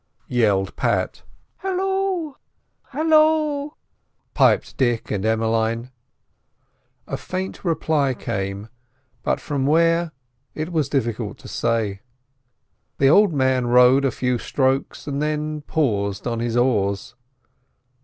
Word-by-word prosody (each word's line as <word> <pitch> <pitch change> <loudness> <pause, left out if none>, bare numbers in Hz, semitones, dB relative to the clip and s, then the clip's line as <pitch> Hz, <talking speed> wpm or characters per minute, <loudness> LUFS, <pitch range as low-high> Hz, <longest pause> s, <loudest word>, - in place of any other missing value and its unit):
yelled 100 -6 +1
Pat. - - -1 0.4
"Halloo! 385 -4 -1 0.6
Halloo!" 310 -1 +2 0.6
piped - - +3
Dick 120 -3 0
and 100 -2 -1
Emmeline. 115 +2 0 1.1
A - - -4
faint 185 +1 -5
reply 155 -5 +1
came, 100 0 -4 0.5
but - - 0
from 140 -2 -2
where, 165 +2 +3 0.4
it 155 +3 -4
was 155 -4 0
difficult 115 -5 -2
to - - -13
say. 110 -4 -1 1.0
The 135 - +4
old 200 +5 +5
man 130 -3 +1
rowed 125 +3 +5
a 135 - +3
few 125 0 -1
strokes 135 +1 -1
and 140 0 -3
then 150 0 -2
paused 105 -10 -1
on 115 -2 -2
his 120 0 -1
oars. 115 -1 0
130 Hz, 110 wpm, -22 LUFS, 115-165 Hz, 1.1 s, old